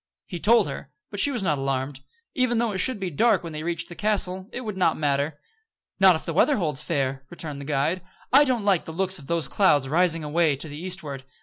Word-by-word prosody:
He 175 - -6
told 230 0 +4
her; 140 -1 -7 0.2
but 205 - -5
she 285 - +5
was 245 -7 -2
not 150 -6 0
alarmed. 135 0 -2 0.3
Even 255 -2 +1
though 230 -1 +1
it 190 - -3
should 255 +2 +1
be 185 -2 -3
dark 205 +4 +2
when 165 -2 -7
they 155 - -5
reached 170 +1 -3
the - - -9
castle, 190 -1 -1
it 250 - -5
would 215 -5 -5
not 180 -4 +2
matter. 145 0 -1 0.6
"Not 190 -2 +7
if 160 - -6
the 165 - -3
weather 280 - +3
holds 150 -7 0
fair," 135 -4 -2
returned 150 -5 -7
the - - -8
guide. 150 +5 0 0.3
"I 280 +2 +8
don't 250 -7 -1
like 195 -5 +2
the 160 - -7
looks 190 +1 0
of 140 - -13
those 170 -2 0
clouds 145 -9 +3
rising 165 +2 +2
away 155 0 +2
to 140 - -5
the 145 - -8
eastward." 155 -8 -3
170 Hz, 235 wpm, -25 LUFS, 145-195 Hz, 0.6 s, I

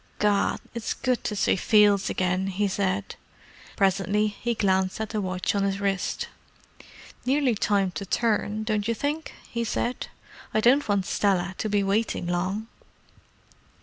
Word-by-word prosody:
"Gad, 205 -1 +2 0.2
it's 235 -2 -3
good 255 -2 0
to 210 - -1
see - - +2
fields 205 0 +4
again!" 185 +1 0
he 200 +2 0
said. 195 0 -1 0.6
Presently 200 +2 +2
he 235 +3 -3
glanced 190 -2 +1
at 220 - -3
the 215 -2 -2
watch 185 -1 -1
on 200 - +1
his 195 0 0
wrist. 195 -2 -1 1.0
"Nearly 270 -1 +2
time 200 -3 +1
to 200 - -5
turn, 215 0 0
don't 215 -1 -1
you 230 - +1
think?" 295 +5 -3
he 235 0 -2
said. 240 +2 -2 0.5
"I - - +5
don't 245 +3 +4
want 200 -2 +2
Stella 190 -2 +1
to 215 - -1
be 205 -1 +2
waiting 200 -1 0
long." 185 +5 -1
205 Hz, 150 wpm, -26 LUFS, 195-220 Hz, 1.0 s, I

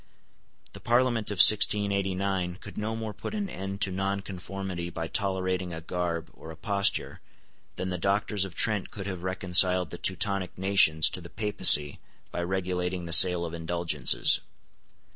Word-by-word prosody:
The - - -10
Parliament 120 -2 0
of 105 - -3
1689 100 -2 +3
could 100 +2 -12
no 110 +1 -4
more 110 -1 -5
put 160 - -7
an 205 -2 -3
end 95 - -7
to 95 - +2
nonconformity 95 -2 -5
by 85 -1 -5
tolerating 95 -3 -2
a 80 - -8
garb 85 -1 -4
or 80 - -13
a 80 - -10
posture 100 +2 -2 0.5
than 95 0 -4
the 90 - -4
Doctors 100 +2 0
of 95 -3 -8
Trent 110 -4 -1
could 95 - -8
have 95 -3 -6
reconciled 90 -1 +2
the - - -8
Teutonic 95 0 -1
nations 90 -5 +4
to 90 - -4
the 85 - -11
Papacy 90 -8 +2 0.3
by 85 - -4
regulating 90 0 -3
the 85 - -1
sale 90 0 +6
of 80 - -7
indulgences. 85 -4 +1
95 Hz, 155 wpm, -27 LUFS, 90-100 Hz, 0.5 s, sale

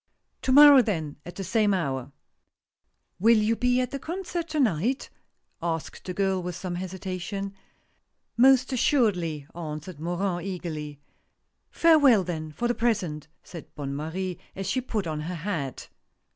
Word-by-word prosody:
To 260 - 0
morrow 285 0 +9
then, 165 -10 -3
at 175 - -8
the 195 - -5
same 205 +1 +2
hour." 135 -6 -3 0.5
" - - -52
Will 225 +4 +5
you 215 +2 +2
be 250 +1 +2
at 250 - -1
the 275 - -4
concert 345 +2 -4
to 310 -1 -2
night? 235 - 0 0.3
" - - -48 0.2
asked 165 -2 -4
the 180 - -4
girl, 190 -2 +1
with 180 -1 -5
some 185 0 -5
hesitation. 190 +2 -5 0.4
" - - -48
Most 260 +2 +5
assuredly," 185 - +1
answered 160 0 -7
Morin, 175 +2 -2
eagerly. 155 -6 -5 0.4
" - - -51 0.2
Farewell, 290 - +5
then, 160 -3 -5
for 205 +11 -2
the 240 - +1
present," 190 -12 -1 0.2
said 170 -3 -11
Bonne 140 -2 -4
Marie, 175 +4 -4 0.2
as 195 - -4
she 255 - 0
put 220 -6 -3
on 155 -2 -3
her 165 +4 -4
hat. 160 -6 -4
185 Hz, 160 wpm, -26 LUFS, 160-235 Hz, 0.5 s, morrow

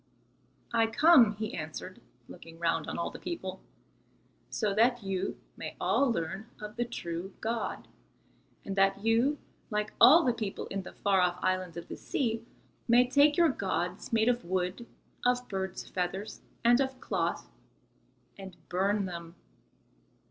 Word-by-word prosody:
"I 225 -1 +4
come," 235 -3 +6
he 215 +1 -4
answered, 155 -1 -6 0.3
looking 165 0 -12
round 170 0 0
on - - -4
all 170 - -2
the - - -9
people, 185 +2 -5 0.9
"so 210 -3 -1
that 235 +2 +3
you 195 -1 -2 0.2
may - - -7
all 275 -3 +2
learn 190 +4 -3
of 210 0 -8
the 240 - -1
true 180 -5 -5
God, 225 +1 -3 0.8
and 195 - -4
that 195 +1 +2
you, 235 +6 +3 0.3
like 210 -1 -2
all 295 +9 +9
the 245 - +2
people 215 -4 -4
in 195 - -3
the 185 - -10
far 195 -2 +2
off 180 0 +1
islands 185 -2 -1
of 170 - -7
the - - -7
sea, 230 -4 -2 0.4
may 245 +1 +5
take 285 +3 +4
your 340 -2 +5
gods 185 -6 -2
made 225 -1 +3
of 245 0 +2
wood, 185 +6 -2 0.4
of 250 0 +1
birds' 190 -1 -4
feathers 190 +3 -4 0.2
and 240 +2 +6
of 265 -1 -2
cloth, - - -2 0.9
and 190 -2 -9
burn 195 +3 +1
them." 170 -2 -7
210 Hz, 150 wpm, -30 LUFS, 185-240 Hz, 0.9 s, all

